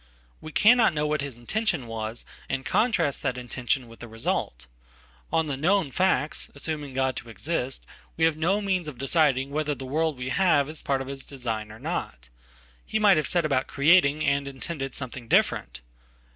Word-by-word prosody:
We 155 - -8
cannot 220 -1 +5
know 150 0 0
what 150 -1 0
his 140 -4 -5
intention 140 - -1
was, 115 0 -5 0.2
and 130 - -1
we - - -20
contrastthat 165 - +1
intention 125 +1 -2
with 115 0 -14
the 120 - -8
result. 110 - -3 0.7
On 160 - +2
the 145 -3 -2
known 170 +2 +2
facts, 155 -5 +1
assuming 145 -2 -4
God 130 -1 +1
toexist, 130 +3 -3 0.4
we 160 - +4
have 165 -1 +3
no 180 +7 +1
means 185 -5 -1
of 145 -5 -7
deciding 135 -1 +2
whether 150 0 -1
the 135 - -8
world 155 +2 0
we 125 0 -4
have 155 -4 +3
ispart 140 -3 -2
of 135 - -6
his 135 -1 -6
design 115 -6 -4
or 110 - -11
not. - - -5 0.5
He 220 - -2
might 205 -4 +5
have 155 -3 +1
set 175 -3 +2
about 135 -3 +1
creating 150 0 +4
andintended 140 0 -2
something 130 -2 -6
different. - - +1
140 Hz, 170 wpm, -26 LUFS, 130-160 Hz, 0.7 s, cannot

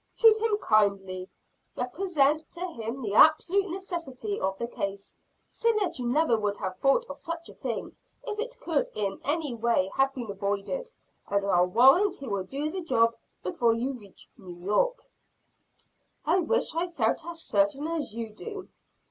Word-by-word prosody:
Treat 445 -1 +6
him 445 -2 +2
kindly, 200 - +1 0.5
represent 305 +1 +1
to 345 - -8
him 235 -2 -5
the 205 -2 -2
absolute 355 - +5
necessity 360 - -4
of 190 0 -1
the 235 - -3
case, 200 -3 -5 0.4
say 465 0 +2
that 380 -9 -1
you 245 - -2
never 245 -3 +3
would 205 -1 -1
have 185 0 -5
thought 275 - +3
of - - -8
such 335 0 -5
a - - -11
thing - - -5 0.3
if 420 - -5
it - - -4
could 320 -5 0
in 200 -2 -2
any 295 -2 -1
way 230 -5 +1
have 270 0 +4
been 240 -5 -5
avoided, 200 - -3 0.4
and 200 0 +1
I'll 180 -2 +3
warrant 270 - +5
he 275 - -8
will 200 -4 -2
do 285 +8 -3
the 375 +2 -3
job 230 -8 +3 0.3
before 225 +5 +2
you 250 +4 -2
reach 205 -7 -14
New 180 -2 -10
York." - - +1 1.2
"I 345 +4 +3
wish 465 +5 +1
I 335 +2 0
felt 240 -10 0
as 335 0 -6
certain 300 0 +1
as 325 -7 -3
you 230 -2 -4
do." 405 - -8
275 Hz, 170 wpm, -28 LUFS, 210-345 Hz, 1.2 s, Treat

